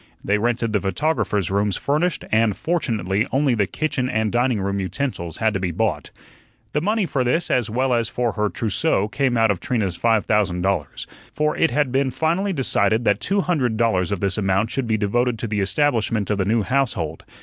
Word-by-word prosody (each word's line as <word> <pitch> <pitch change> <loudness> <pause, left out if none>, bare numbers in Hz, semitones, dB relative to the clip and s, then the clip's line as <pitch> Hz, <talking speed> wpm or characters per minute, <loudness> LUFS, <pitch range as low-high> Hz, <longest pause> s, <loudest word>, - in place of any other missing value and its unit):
They 105 +1 +2
rented 115 0 0
the 105 - +1
photographer's 105 - 0
rooms 100 -1 +1
furnished, 155 +5 0
and 110 -2 +2
fortunately 110 - -1
only 135 -1 +2
the 105 -4 +1
kitchen 130 - -2
and 110 -3 0
dining 120 -2 +1
room 100 +1 -2
utensils 95 - -3
had 110 -1 +1
to 95 - -1
be 95 -1 -1
bought. 85 - -1 0.6
The 150 - +1
money 210 +3 +1
for 140 -5 -1
this 160 +8 0
as 120 -3 +1
well 130 +3 0
as 115 -1 0
for 120 -1 -1
her 105 -1 -1
trousseau 110 -1 0
came 130 +1 0
out 115 -2 +4
of 95 - -2
Trina's 105 -8 -1
five 115 -2 +2
thousand 95 -5 +1
dollars. 95 -6 -2 0.3
For 150 0 +1
it 165 - +2
had 145 0 0
been 135 +1 +1
finally 170 +9 0
decided 115 - +1
that 105 0 +2
two 200 +1 0
hundred 135 -12 0
dollars 105 -6 +1
of 100 - -2
this 100 0 0
amount 95 +2 +1
should 135 -3 -2
be 110 -1 +1
devoted 120 +4 0
to 115 - -4
the 105 -1 -2
establishment 110 -1 +1
of 100 - 0
the 95 - +1
new 110 +2 +1
household. 105 - -1
115 Hz, 205 wpm, -22 LUFS, 100-135 Hz, 0.6 s, out